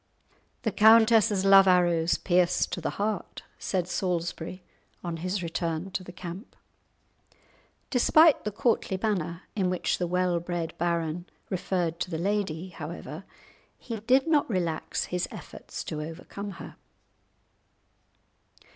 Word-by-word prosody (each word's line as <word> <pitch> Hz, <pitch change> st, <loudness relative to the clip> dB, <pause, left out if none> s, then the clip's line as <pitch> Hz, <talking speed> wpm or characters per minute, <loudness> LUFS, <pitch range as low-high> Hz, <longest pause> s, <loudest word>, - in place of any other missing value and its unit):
"The -, -, 0 dB
countess's 220 Hz, -2 st, +5 dB
love 195 Hz, 0 st, +8 dB
arrows 175 Hz, -2 st, +3 dB
pierce 180 Hz, -1 st, +2 dB
to -, -, -5 dB
the -, -, -1 dB
heart," 210 Hz, 0 st, -3 dB, 0.2 s
said 180 Hz, -3 st, -1 dB
Salisbury, 175 Hz, -1 st, -3 dB, 0.4 s
on 170 Hz, -2 st, -3 dB
his 185 Hz, +3 st, -2 dB
return 165 Hz, +2 st, -3 dB
to 185 Hz, -, -3 dB
the 180 Hz, -, -10 dB
camp. 180 Hz, +5 st, -9 dB, 1.4 s
Despite 310 Hz, +5 st, +5 dB
the 210 Hz, -, -2 dB
courtly 210 Hz, -2 st, 0 dB
manner 180 Hz, -5 st, -2 dB
in 190 Hz, -4 st, +1 dB
which 180 Hz, -, -1 dB
the 175 Hz, -, 0 dB
well 180 Hz, 0 st, +1 dB
bred 170 Hz, -1 st, -4 dB
baron 170 Hz, 0 st, -1 dB, 0.2 s
referred 175 Hz, -2 st, -1 dB
to -, -, -2 dB
the 165 Hz, -, -3 dB
lady, 185 Hz, -2 st, -1 dB
however, 160 Hz, 0 st, -8 dB, 0.5 s
he 230 Hz, -3 st, -6 dB
did 260 Hz, +6 st, +3 dB
not 305 Hz, -5 st, +2 dB
relax 170 Hz, -6 st, -1 dB
his 180 Hz, 0 st, -2 dB
efforts -, -, -8 dB
to 150 Hz, -, -4 dB
overcome 180 Hz, +5 st, -7 dB
her. -, -, -10 dB
180 Hz, 130 wpm, -27 LUFS, 170-200 Hz, 1.4 s, love